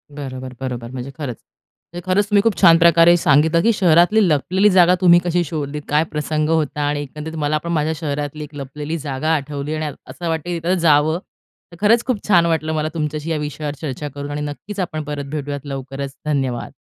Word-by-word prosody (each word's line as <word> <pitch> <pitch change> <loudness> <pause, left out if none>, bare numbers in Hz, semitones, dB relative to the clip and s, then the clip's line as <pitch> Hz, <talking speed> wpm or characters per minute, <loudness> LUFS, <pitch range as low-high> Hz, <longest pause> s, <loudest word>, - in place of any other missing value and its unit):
बरोबर, 130 -2 -7
बरोबर. 120 -2 -5
म्हणजे 130 +1 -6
खरंच, 140 -7 -4 0.6
म्हणजे 175 - -6
खरंच 190 +2 +2
तुम्ही 205 -1 +4
खूप 225 -3 +1
छान 165 -3 +8
प्रकारे 170 0 +6
सांगितलं 160 +2 +3
की 230 - +3
शहरातली 185 +3 +4
लपलेली 185 +8 +2
जागा 180 -1 +5
तुम्ही 175 -1 +7
कशी 175 0 +1
शोधलीत? 150 -1 -4
काय 150 +2 +3
प्रसंग 150 0 -1
होता? 155 -2 0
आणि 145 0 -1
एकंदरीत 150 +3 -7
मला 150 0 0
पण 170 - -3
माझ्या 155 0 0
शहरातली 145 -1 -4
एक 145 0 -11
लपलेली 145 +3 -5
जागा 145 0 -3
आठवली 145 +1 -4
आणि 155 -1 -3 0.2
असं 175 - -6
वाटतं 165 +1 -3
आहे 170 -1 -2
तिथं 175 +3 0
जावं. 155 0 +3 0.5
तर 170 - -13
खरंच 230 +2 +5
खूप 250 -5 -2
छान 175 -5 +5
वाटलं 160 -1 0
मला 155 0 -1
तुमच्याशी 155 0 -3
या 155 - 0
विषयावर 150 0 -4
चर्चा 145 0 -4
करून 145 0 -6
आणि 145 - -3
नक्कीचं 185 +7 -5
आपण 155 -3 -3
परत 145 -1 -5
भेटूयात 145 -1 -4
लवकरच. 135 0 -6
धन्यवाद! 135 -5 -2
155 Hz, 195 wpm, -20 LUFS, 145-170 Hz, 0.6 s, छान